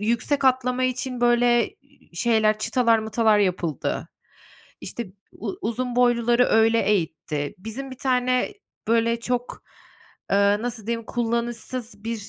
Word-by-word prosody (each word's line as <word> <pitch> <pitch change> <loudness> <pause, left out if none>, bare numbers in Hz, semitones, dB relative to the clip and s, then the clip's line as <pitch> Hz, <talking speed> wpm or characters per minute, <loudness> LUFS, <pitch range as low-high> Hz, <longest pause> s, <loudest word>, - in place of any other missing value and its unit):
yüksek 235 +6 0
atlama 255 0 +2
için 255 -1 -2
böyle, 240 -1 +3
iii, 280 -11 -23
şeyler 215 0 +2
çıtalar 230 0 +2
mıtalar 220 -1 +2
yapıldı. 180 -5 -1 0.7
İşte 235 -3 -6 0.3
u 380 - -6
uzun 245 +1 -2
boyluları 240 0 +3
öyle 225 +1 +4
eğitti. 160 -6 -1
Bizim 235 +7 -7
bir 260 - -10
tane, 255 +6 +1 0.3
böyle, 230 0 +2
çok, 245 +1 -3 0.7
eee, 195 - +3 0.2
nasıl 235 -3 -5
diyeyim 230 -1 -3
kullanışsız 235 -1 -3
bir 225 -3 -4
235 Hz, 120 wpm, -24 LUFS, 220-250 Hz, 0.7 s, öyle